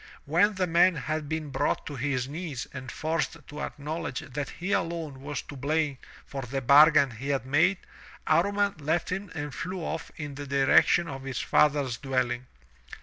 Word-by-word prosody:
When 180 +8 +3
the 185 -1 +1
man 175 +1 +4
had 150 +1 -3
been 155 -2 -3
brought 135 - 0
to 145 - -6
his 130 -1 -1
knees 150 -3 -5
and 130 -2 -7
forced 160 +1 -1
to 150 0 -7
acknowledge 155 -1 -4
that 140 +2 -5
he 180 +3 -5
alone 165 -7 -2
was 145 +1 -4
to 145 - -10
blame 145 0 0 0.3
for 135 - -5
the 135 +2 -3
bargain 140 +1 +6
he 125 +5 -6
had 135 -3 0
made, 165 +8 +3 0.5
Amman 200 +5 +2
left 160 +5 0
him 190 0 -3
and 145 -2 -4
flew 180 +4 -4
off 160 0 -4
in 150 -3 -6
the 145 +1 -7
direction 140 +5 +4
of 135 -3 -6
his 135 -2 -4
father's 145 -5 +2
dwelling. 130 -2 -1
150 Hz, 175 wpm, -28 LUFS, 135-165 Hz, 0.5 s, bargain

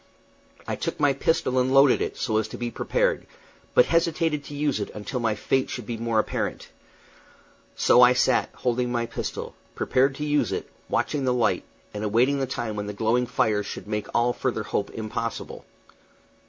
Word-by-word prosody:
I - - -1
took - - -3
my 145 -2 +4
pistol 140 -2 +1
and 125 +1 +1
loaded 135 0 +5
it, - - -3
so 110 -3 0
as 110 -1 0
to - - -8
be 120 -1 -3
prepared, - - 0 0.5
but - - +7
hesitated 165 -3 +1
to 145 - -8
use 145 -4 0
it 100 - -3
until 110 +5 -4
my 115 -2 0
fate 130 +5 0
should 125 - -5
be 120 - -4
more 115 0 -1
apparent. 110 - -2 1.1
So 125 - +5
I 125 0 +8
sat, 125 0 +2
holding 125 0 -1
my 120 -1 0
pistol, 115 - -5 0.2
prepared 135 +1 +2
to 150 - -4
use 150 0 +1
it, - - -3 0.2
watching 145 -2 0
the 125 -1 +2
light, 120 - +1 0.3
and 105 0 -4
awaiting 120 +7 +2
the 135 - -1
time 120 -4 -3
when 105 0 -4
the 105 - -4
glowing 115 +4 +1
fires 105 -4 +1
should - - -7
make 105 -1 -3
all 120 +1 +2
further 120 -5 -2
hope 100 - -2
impossible. 115 +1 -5
125 Hz, 185 wpm, -25 LUFS, 110-135 Hz, 1.1 s, I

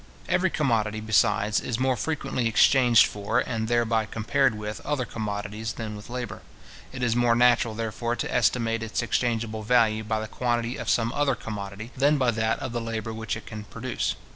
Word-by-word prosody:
Every 180 +1 +2
commodity, 110 -9 0
besides, 110 -1 +2
is 120 - -3
more 130 0 +1
frequently 135 -4 -2
exchanged 120 +1 +5
for, 105 0 -2
and 110 -2 -1
thereby 115 -2 +1
compared 120 +3 +1
with, 105 0 -5
other 145 -4 -1
commodities, 105 0 -4
than 110 -2 -5
with 105 +2 -10
labour. 120 -3 -5 0.5
It 130 -1 -5
is 120 -2 +2
more 120 -1 +3
natural, 120 -2 +3
therefore, 115 +1 -2
to - - -3
estimate 115 -2 +1
its 115 +1 -2
exchangeable 115 -2 -1
value 110 -1 +3
by 110 0 -1
the 110 - -4
quantity 120 +1 -1
of - - -4
some 115 0 +1
other 145 -2 +1
commodity, 105 +1 -7
than 145 +3 +3
by 130 -3 +2
that 110 0 0
of - - -5
the 120 0 -2
labour 115 -1 -4
which 110 -1 -3
it 110 - -11
can 105 -2 -8
produce. 120 +3 -3
115 Hz, 185 wpm, -26 LUFS, 110-125 Hz, 0.5 s, exchanged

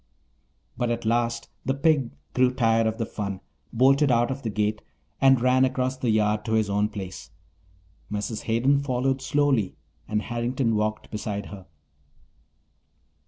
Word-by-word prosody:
But 120 - 0
at 120 -1 -2
last 115 +1 0 0.2
the 135 - 0
pig 140 -3 +2 0.2
grew 125 0 +3
tired 115 -3 +2
of 110 0 -2
the 115 - -1
fun, 100 -3 -4 0.3
bolted 135 +4 +4
out 120 +1 +2
of 135 +1 -4
the 115 - -3
gate, 105 0 -1 0.4
and 135 -2 +6
ran 130 +1 +3
across 130 0 0
the 130 -2 -2
yard 105 -1 +2
to 110 - -1
his 110 -2 +1
own 105 +1 +1
place. 95 -3 -7 0.8
Mrs. 105 +1 -3
Hayden 125 +5 +2
followed 135 -1 0
slowly 135 -8 +1 0.3
and 105 0 -1
Harrington 120 0 -1
walked 110 0 -2
beside 105 -1 -4
her. 95 -2 -10
115 Hz, 150 wpm, -25 LUFS, 105-130 Hz, 0.8 s, and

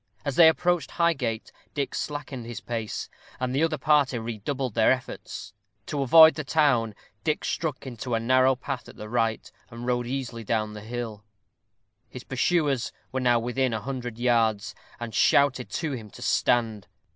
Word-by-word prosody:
As 140 - -2
they 165 - +8
approached 175 +1 0
Highgate, 135 -10 -1 0.2
Dick 140 -2 -2
slackened 145 -5 -5
his 120 - -6
pace, 115 -3 -4 0.3
and 130 0 -2
the 140 - +1
other 160 -1 +1
party 145 -3 +3
redoubled 120 +3 -3
their 110 0 +4
efforts. 125 -5 -4 0.3
To 145 -2 -3
avoid 160 +4 +8
the 150 - -4
town, 135 -8 +2 0.3
Dick 155 -2 -1
struck 150 -6 -3
into 120 -1 -4
a - - +1
narrow 130 +3 +4
path 130 0 -6
at - - -13
the 105 - -8
right, 115 -1 -1 0.2
and 120 0 -8
rode 120 -1 0
easily 125 -3 -4
down 110 0 -1
the 105 - -8
hill. 110 -1 -6 0.9
His 125 - -9
pursuers 140 -2 0 0.2
were 130 - -1
now 120 -2 +3
within 125 +1 0
a - - -2
hundred 125 -2 -5
yards, 115 -4 +1 0.3
and 120 -2 -6
shouted 135 -3 +3
to 160 -3 -2
him 115 -6 -6
to - - -11
stand. 115 -4 +1
125 Hz, 170 wpm, -26 LUFS, 115-140 Hz, 0.9 s, they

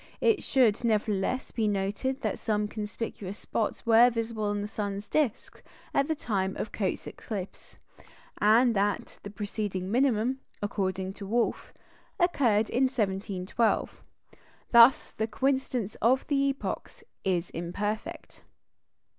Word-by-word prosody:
It 450 -3 +3
should, 245 -5 +2
nevertheless, 215 +1 0
be 220 -2 0
noted 205 +7 -1
that - - -2
some 210 -2 0
conspicuous 210 -2 -5
spots 220 - -3
were 230 +1 +7
visible 230 -2 -3
on 205 0 -1
the - - -3
sun's 205 -1 -4
disc 270 -1 -1 0.3
at 275 - +2
the 315 - 0
time 195 -8 -2
of 215 - -4
Cotes's 195 -4 -2
eclipse, 200 -4 -7 0.6
and 230 +3 +5
that 205 0 -1
the 205 - -7
preceding 200 -2 -4
minimum 250 0 +2 0.2
(according 190 -2 -2
to 200 -1 -8
Wolf) 235 +3 0 0.5
occurred 240 - +3
in 260 +2 +3
1712. 205 -2 -1 0.7
Thus, 235 +2 +7
the 220 - -2
coincidence 255 -3 -1
of 255 +3 +3
epochs 275 - -1 0.2
is 180 -2 0
imperfect. 205 +6 -4
215 Hz, 120 wpm, -28 LUFS, 200-245 Hz, 0.7 s, were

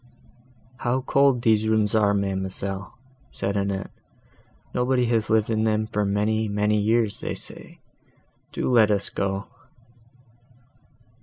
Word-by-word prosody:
"How 130 +1 -1
cold 135 -2 +2
these 110 -1 +3
rooms 110 -2 +2
are, 105 -2 +3
ma'amselle!" 95 0 -3 0.3
said 100 +1 -3
Annette: 100 -1 -2 0.8
"nobody 125 0 +1
has 115 -2 0
lived 110 0 +2
in 110 0 +1
them 110 -1 +1
for 105 -1 -1
many, 105 +2 0
many 105 +1 +1
years, 110 0 +1
they - - -4
say. - - -10 0.7
Do - - -3
let 115 -4 +5
us 100 -1 +1
go." 100 0 -2
105 Hz, 125 wpm, -24 LUFS, 100-115 Hz, 0.8 s, let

